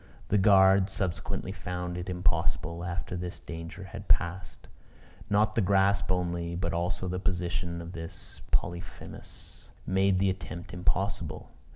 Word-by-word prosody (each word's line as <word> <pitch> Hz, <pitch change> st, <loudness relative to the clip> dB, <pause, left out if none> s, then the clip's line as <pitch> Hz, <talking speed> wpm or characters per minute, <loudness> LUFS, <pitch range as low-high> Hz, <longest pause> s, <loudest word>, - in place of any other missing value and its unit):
The 105 Hz, -, +4 dB
guard 95 Hz, -1 st, +6 dB
subsequently 95 Hz, 0 st, -2 dB
found 90 Hz, -1 st, -4 dB
it 90 Hz, +1 st, -4 dB
impossible, 85 Hz, -2 st, 0 dB
after 90 Hz, 0 st, -3 dB
this 90 Hz, 0 st, -4 dB
danger 85 Hz, +3 st, -7 dB
had 95 Hz, -, -8 dB
passed. 85 Hz, 0 st, +1 dB, 0.6 s
Not 105 Hz, +1 st, +3 dB
the 115 Hz, -, +2 dB
grasp 95 Hz, -2 st, +3 dB
only, 85 Hz, -1 st, -1 dB
but 90 Hz, 0 st, -1 dB
also 90 Hz, +2 st, -1 dB
the 90 Hz, 0 st, -1 dB
position 85 Hz, -2 st, -1 dB
of 85 Hz, -, -7 dB
this 80 Hz, -1 st, -8 dB
Polyphemus, 85 Hz, +2 st, -4 dB, 0.2 s
made 95 Hz, 0 st, +3 dB
the 95 Hz, 0 st, +3 dB
attempt 90 Hz, -2 st, -7 dB
impossible. 95 Hz, -1 st, -1 dB
90 Hz, 135 wpm, -29 LUFS, 85-95 Hz, 0.6 s, guard